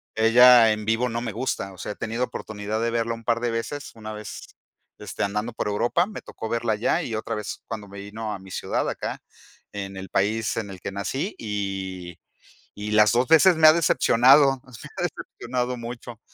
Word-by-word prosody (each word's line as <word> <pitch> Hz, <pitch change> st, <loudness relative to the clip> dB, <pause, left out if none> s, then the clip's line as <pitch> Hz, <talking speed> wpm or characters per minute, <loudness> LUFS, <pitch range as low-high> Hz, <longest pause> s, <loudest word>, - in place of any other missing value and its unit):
ella 115 Hz, 0 st, +7 dB
en 105 Hz, -1 st, -3 dB
vivo 115 Hz, +3 st, +1 dB
no 115 Hz, +1 st, -3 dB
me 115 Hz, -, -3 dB
gusta, 105 Hz, -4 st, -3 dB
o -, -, -15 dB
sea, 95 Hz, -, -5 dB
he -, -, -21 dB
tenido 115 Hz, +3 st, -3 dB
oportunidad 110 Hz, -2 st, -4 dB
de 115 Hz, -, +1 dB
verla 115 Hz, 0 st, 0 dB
un 115 Hz, 0 st, -9 dB
par 115 Hz, +1 st, +1 dB
de 120 Hz, 0 st, -1 dB
veces, 125 Hz, +5 st, -4 dB
una 110 Hz, -1 st, -8 dB
vez 105 Hz, -1 st, -8 dB, 0.6 s
este, -, -, -5 dB
andando 105 Hz, +3 st, -2 dB
por 110 Hz, -, -3 dB
Europa, 120 Hz, +11 st, +1 dB
me 205 Hz, -1 st, -8 dB
tocó 110 Hz, -, -7 dB
verla 115 Hz, -1 st, 0 dB
allá 115 Hz, +10 st, +1 dB
y 115 Hz, -, -4 dB
otra 110 Hz, 0 st, -3 dB
vez 105 Hz, -1 st, -6 dB
cuando 105 Hz, -3 st, -6 dB
me 100 Hz, 0 st, -10 dB
vino 105 Hz, +2 st, -6 dB
a -, -, -6 dB
mi 95 Hz, 0 st, -14 dB
ciudad -, -, -2 dB
acá, -, -, -5 dB, 0.5 s
en 100 Hz, -1 st, -6 dB
el 95 Hz, 0 st, -7 dB
país 105 Hz, +2 st, 0 dB
en 110 Hz, -3 st, -3 dB
el 95 Hz, -1 st, -9 dB
que -, -, -5 dB
nací 135 Hz, -, -3 dB
y 95 Hz, -4 st, -4 dB, 0.6 s
y 105 Hz, +1 st, -4 dB
las 105 Hz, 0 st, +5 dB
dos 125 Hz, +2 st, +2 dB
veces 170 Hz, +3 st, +7 dB
me 160 Hz, -1 st, +6 dB
ha 155 Hz, -, +7 dB
decepcionado, 135 Hz, -3 st, +4 dB
me 130 Hz, -, -17 dB, 0.3 s
ha -, -, -1 dB
decepcionado 125 Hz, +1 st, -3 dB
mucho, 120 Hz, -1 st, -8 dB
115 Hz, 205 wpm, -24 LUFS, 105-125 Hz, 0.6 s, ella